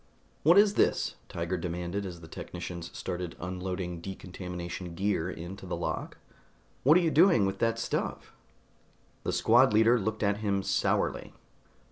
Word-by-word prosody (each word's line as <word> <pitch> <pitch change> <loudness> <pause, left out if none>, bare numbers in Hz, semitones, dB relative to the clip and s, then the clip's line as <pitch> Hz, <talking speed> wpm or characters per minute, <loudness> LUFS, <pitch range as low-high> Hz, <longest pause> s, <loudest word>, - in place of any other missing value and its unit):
"What 170 +5 +6
is 205 0 +6
this?" - - +2 0.2
Tiger 85 +2 -2
demanded 90 +3 -3
as 85 -2 -8
the 80 - -11
technicians 85 0 -7
started 90 -1 -4
unloading 90 -1 -4
decontamination 90 -2 -6
gear 95 -2 0
into 90 +3 -7
the - - -2
lock. - - -4 0.6
"What 150 +6 +6
are - - +4
you 165 -2 +1
doing 165 - +5
with 95 0 -2
that 115 0 +1
stuff?" 115 - -3 0.9
The - - -2
squad 120 +1 +4
leader 115 +3 +5
looked 110 +2 -2
at 100 0 +2
him 100 -2 0
sourly. - - 0
95 Hz, 145 wpm, -29 LUFS, 90-110 Hz, 0.9 s, What